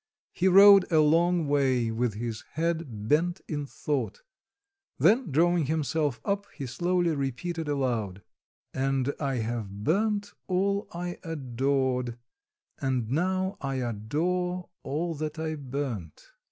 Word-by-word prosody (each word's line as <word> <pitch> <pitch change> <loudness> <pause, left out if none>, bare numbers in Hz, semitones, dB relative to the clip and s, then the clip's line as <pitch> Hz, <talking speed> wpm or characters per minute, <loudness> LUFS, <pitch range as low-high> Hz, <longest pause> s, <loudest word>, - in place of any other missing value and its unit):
He 185 - +1
rode 195 0 +8
a 160 - +5
long 165 +2 +3
way 130 -5 +2
with 115 -1 -1
his 115 0 -4
head 160 -10 -2
bent 170 +6 +2
in 145 -2 -3
thought, 150 - -3 0.7
then 225 +7 +4
drawing 170 +1 +3
himself 150 -3 0
up, 200 0 -1
he 140 - -5
slowly 175 +6 +1
repeated 150 +5 -3
aloud: 115 -10 -1 0.5
"And 135 +1 0
I 140 -3 -1
have 110 -4 -4
burnt 205 - +1
all 200 +2 0
I 175 +1 -5
adored, 130 -4 -1 0.6
And 130 -4 -1
now 185 +5 0
I 135 -1 -2
adore 165 - -2
all 165 +5 -2
that 155 0 -4
I 160 0 -2
burnt." 130 - -5
150 Hz, 125 wpm, -28 LUFS, 130-175 Hz, 0.7 s, rode